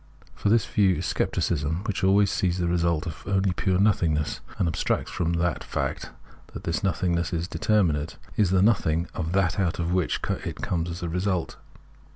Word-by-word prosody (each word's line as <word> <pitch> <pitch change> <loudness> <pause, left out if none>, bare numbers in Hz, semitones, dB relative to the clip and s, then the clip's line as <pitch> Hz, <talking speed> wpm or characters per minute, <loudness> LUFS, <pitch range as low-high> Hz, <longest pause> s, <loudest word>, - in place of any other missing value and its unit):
For 105 - -1
this 115 0 +4
view 95 -3 +3
is - - -3
scepticism, 80 +3 -1
which 105 -2 -3
always 100 +1 +4
sees 90 -1 0
in 90 - 0
the 85 - 0
result 85 -1 +1 0.2
only 95 -1 +2
pure 95 0 +1
nothingness, 85 -7 +1 0.2
and 95 -4 +1
abstracts 80 - -1
from 85 -1 -1
the 85 -1 +1
fact - - -3 0.5
that - - -6
this 85 +2 -2
nothing 90 -2 +1
is 85 0 -2
determinate, 85 -9 +1 0.2
is 105 -4 +3
the 95 0 +3
nothing 85 -6 +2
of 80 0 -3
that 95 -1 +1
out 90 -3 0
of 85 -1 -1
wliicJi 90 -1 -1
it - - -4
comes 85 -1 -2
as 85 +1 -6
a - - -1
resiilt. 90 +1 -1
90 Hz, 185 wpm, -26 LUFS, 85-95 Hz, 0.5 s, this